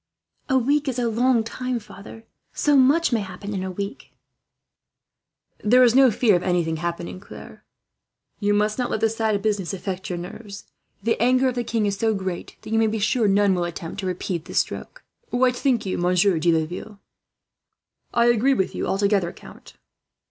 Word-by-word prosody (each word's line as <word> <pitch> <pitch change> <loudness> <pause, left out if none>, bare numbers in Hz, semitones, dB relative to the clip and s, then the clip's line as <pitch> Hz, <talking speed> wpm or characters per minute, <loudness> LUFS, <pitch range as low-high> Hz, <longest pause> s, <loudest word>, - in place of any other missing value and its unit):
"A 265 - +4
week 285 +4 +1
is 260 -2 -2
a 245 -1 0
long 235 +1 +2
time, 255 +2 -3
father. 210 +1 -12 0.3
So 295 -1 +2
much 280 +3 +4
may 230 - +2
happen 200 +1 -6
in 190 - -2
a 190 - -3
week." 200 +3 -6 1.5
"There 250 +4 +5
is 240 -2 +5
no 265 0 +6
fear 220 -2 +3
of 175 - +1
anything 175 -3 0
happening, 170 +2 -4
Claire. 195 - -12 0.8
You 205 0 +1
must 210 +3 0
not 250 - 0
let - - -1
this 225 +1 0
sad 220 -2 +1
business 205 -3 -1
affect 190 0 -5
your 180 - -3
nerves. 200 +3 -9 0.4
The 230 +1 0
anger 255 +2 +3
of - - -3
the 245 0 -2
king 225 -2 -1
is 200 -1 -1
so 220 -1 +1
great 190 -3 -5
that - - -9
you 225 - +3
may 225 - +3
be 220 +1 -1
sure 220 +2 +1
none 200 0 +3
will 180 -1 0
attempt 170 +2 -6
to 190 - -3
repeat 180 -2 -3
this - - -5
stroke. - - -8 0.3
"What 250 0 +2
think 245 -4 0
you, 190 - -2
Monsieur 180 0 +2
de 170 +2 +3
Laville?" 175 +6 -3 1.1
"I 235 - +3
agree 240 +3 +3
with 190 - -1
you - - -3
altogether, 195 -3 +1
count." - - -15
210 Hz, 190 wpm, -23 LUFS, 185-240 Hz, 1.5 s, no